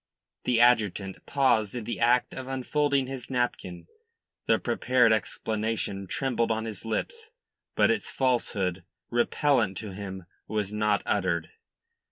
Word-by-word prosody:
The 120 Hz, -2 st, +2 dB
adjutant 105 Hz, -5 st, +2 dB
paused 120 Hz, -6 st, +2 dB
in 120 Hz, -, -3 dB
the 120 Hz, -, -4 dB
act 120 Hz, +2 st, +3 dB
of 130 Hz, -1 st, -7 dB
unfolding 135 Hz, +1 st, 0 dB
his 130 Hz, -1 st, -7 dB
napkin. 105 Hz, -9 st, -2 dB, 0.6 s
The -, -, +4 dB
prepared 125 Hz, -2 st, +2 dB
explanation 110 Hz, -2 st, -2 dB
trembled 125 Hz, -2 st, 0 dB
on 110 Hz, 0 st, -1 dB
his 110 Hz, -2 st, -5 dB
lips; 440 Hz, -, -3 dB, 0.5 s
but -, -, +4 dB
its -, -, -1 dB
falsehood, 100 Hz, -8 st, 0 dB, 0.3 s
repellent 120 Hz, -3 st, +2 dB
to 105 Hz, -3 st, -6 dB
him, 95 Hz, -2 st, -7 dB, 0.2 s
was 105 Hz, -2 st, -2 dB
not 105 Hz, -1 st, +1 dB
uttered. 90 Hz, -5 st, 0 dB
115 Hz, 130 wpm, -27 LUFS, 100-125 Hz, 0.6 s, The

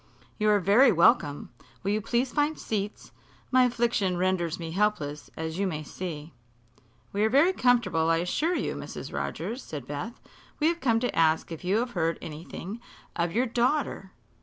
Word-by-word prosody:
"You 215 Hz, 0 st, +3 dB
are 205 Hz, -1 st, +5 dB
very 215 Hz, +7 st, +5 dB
welcome. 145 Hz, -6 st, +3 dB, 0.3 s
Will 200 Hz, -, 0 dB
you 215 Hz, +1 st, 0 dB
please 240 Hz, +5 st, 0 dB
find 295 Hz, +1 st, +1 dB
seats? 210 Hz, -1 st, -4 dB, 0.4 s
My 255 Hz, -1 st, +6 dB
affliction 235 Hz, -6 st, +1 dB
renders 180 Hz, -2 st, 0 dB
me 165 Hz, -1 st, -6 dB
helpless, 170 Hz, -7 st, -1 dB
as 160 Hz, +2 st, -4 dB
you 200 Hz, -, +1 dB
may 155 Hz, -4 st, -3 dB
see." 160 Hz, -2 st, -7 dB, 0.8 s
"We 205 Hz, +1 st, +1 dB
are 220 Hz, -, +3 dB
very 290 Hz, +10 st, +4 dB
comfortable, 200 Hz, -, +2 dB
I 165 Hz, -, +4 dB
assure 300 Hz, -, 0 dB
you, -, -, -1 dB
Mrs. -, -, -7 dB
Rogers," 245 Hz, +4 st, -3 dB
said 145 Hz, -5 st, -7 dB
Beth. 145 Hz, -, -6 dB, 0.4 s
"We 310 Hz, +1 st, +4 dB
have 340 Hz, 0 st, -2 dB
come 230 Hz, -4 st, +3 dB
to 245 Hz, -, -1 dB
ask 160 Hz, 0 st, +2 dB
if 165 Hz, -, -7 dB
you 190 Hz, +4 st, +2 dB
have 240 Hz, +2 st, -1 dB
heard 165 Hz, -5 st, 0 dB
anything 170 Hz, +7 st, -7 dB, 0.4 s
of 170 Hz, -1 st, 0 dB
your 240 Hz, +7 st, +2 dB
daughter." 240 Hz, -4 st, 0 dB
200 Hz, 175 wpm, -27 LUFS, 165-240 Hz, 0.8 s, My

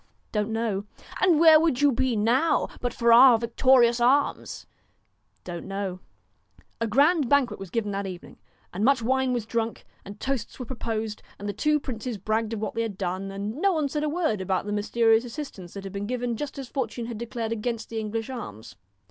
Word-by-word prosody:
' -, -, -42 dB
Don't 210 Hz, 0 st, -1 dB
know.' 220 Hz, -3 st, -2 dB, 0.4 s
'And 355 Hz, -4 st, +4 dB
where 320 Hz, -1 st, +8 dB
would 315 Hz, -6 st, +1 dB
you 290 Hz, -, +6 dB
be 255 Hz, 0 st, 0 dB
now, 240 Hz, +10 st, +2 dB
but 245 Hz, -, -2 dB
for 235 Hz, 0 st, +3 dB
our 245 Hz, 0 st, +8 dB
victorious 235 Hz, +1 st, +3 dB
arms? 270 Hz, +4 st, +1 dB, 0.3 s
' -, -, -45 dB
' -, -, -44 dB
Don't 175 Hz, -1 st, -7 dB
know.' 195 Hz, -2 st, -4 dB, 0.8 s
A 230 Hz, -, 0 dB
grand 285 Hz, +4 st, +3 dB
banquet 285 Hz, -4 st, +2 dB
was 195 Hz, -2 st, -8 dB
given 210 Hz, +1 st, -2 dB
that 200 Hz, 0 st, -3 dB
evening. 180 Hz, -2 st, -9 dB, 0.3 s
And 195 Hz, +4 st, -2 dB
much 255 Hz, -1 st, +3 dB
wine 260 Hz, +2 st, +1 dB
was 240 Hz, -3 st, -1 dB
drunk, 230 Hz, 0 st, -3 dB, 0.2 s
and 200 Hz, +2 st, -10 dB
toasts 265 Hz, -5 st, -3 dB
were 250 Hz, -, -6 dB
proposed, 225 Hz, -3 st, -4 dB, 0.2 s
and 205 Hz, -, -6 dB
the 205 Hz, -, -2 dB
two 300 Hz, +9 st, +1 dB
princes 245 Hz, -3 st, -5 dB
bragged 215 Hz, +3 st, -1 dB
of 220 Hz, -, -3 dB
what 215 Hz, -1 st, -3 dB
they 230 Hz, -, -1 dB
had 220 Hz, -4 st, -4 dB
done, 190 Hz, +1 st, -3 dB
and 200 Hz, +4 st, -5 dB
no 390 Hz, +4 st, +2 dB
one 310 Hz, -3 st, 0 dB
said 300 Hz, +2 st, -2 dB
a 305 Hz, -, 0 dB
word 305 Hz, -, 0 dB
about 190 Hz, 0 st, -1 dB
the 205 Hz, -, -4 dB
mysterious 225 Hz, +2 st, +3 dB
assistance 235 Hz, -, -8 dB
that 200 Hz, -, -6 dB
had 195 Hz, 0 st, -7 dB
been 200 Hz, +1 st, -4 dB
given 245 Hz, -1 st, -2 dB
just 285 Hz, +4 st, -5 dB
as 270 Hz, -2 st, -6 dB
fortune 240 Hz, -3 st, -3 dB
had 230 Hz, -2 st, -6 dB
declared 235 Hz, -1 st, -4 dB
against 230 Hz, 0 st, -3 dB
the 225 Hz, -, -3 dB
English 220 Hz, +1 st, -3 dB
arms. 110 Hz, -, -8 dB
230 Hz, 210 wpm, -26 LUFS, 210-260 Hz, 0.8 s, where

